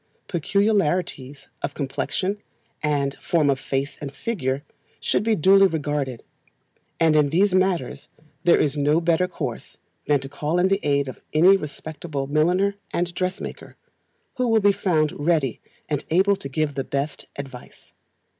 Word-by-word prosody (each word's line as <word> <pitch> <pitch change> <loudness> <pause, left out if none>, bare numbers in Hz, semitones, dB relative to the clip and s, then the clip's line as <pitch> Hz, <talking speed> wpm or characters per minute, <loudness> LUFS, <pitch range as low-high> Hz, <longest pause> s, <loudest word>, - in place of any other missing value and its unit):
Peculiarities 175 -7 0
of - - -3
complexion, 145 +8 -2 0.4
and 145 -2 0
form 160 -5 +2
of 135 - -1
face 135 +1 -3
and 140 -2 -5
figure, 140 - -2 0.4
should - - +1
be 220 +1 +2
duly 195 +2 +6
regarded; 145 -7 -2 0.8
and 160 -2 +4
in 150 -2 +4
these 185 +5 +3
matters 185 -8 0 0.3
there 175 - +5
is 145 -1 +1
no 150 +2 +3
better 170 +1 +2
course 180 - -6 0.3
than 145 -1 +3
to 135 - -7
call 150 +4 -2
in 180 +1 +3
the 195 0 +2
aid 140 -1 +1
of 130 - -8
any 175 +6 +7
respectable 150 -3 -5
milliner 175 +8 +2 0.2
and 175 0 -1
dressmaker, 185 +2 -4 0.6
who 250 -1 +1
will 225 -1 +4
be 200 0 +5
found 155 -6 +1
ready 145 -5 0 0.3
and 150 -2 -2
able 190 +4 +4
to 140 - -8
give 150 +1 -1
the 135 0 -2
best 140 +2 -3
advice. 135 -3 -10
155 Hz, 150 wpm, -23 LUFS, 140-185 Hz, 0.8 s, any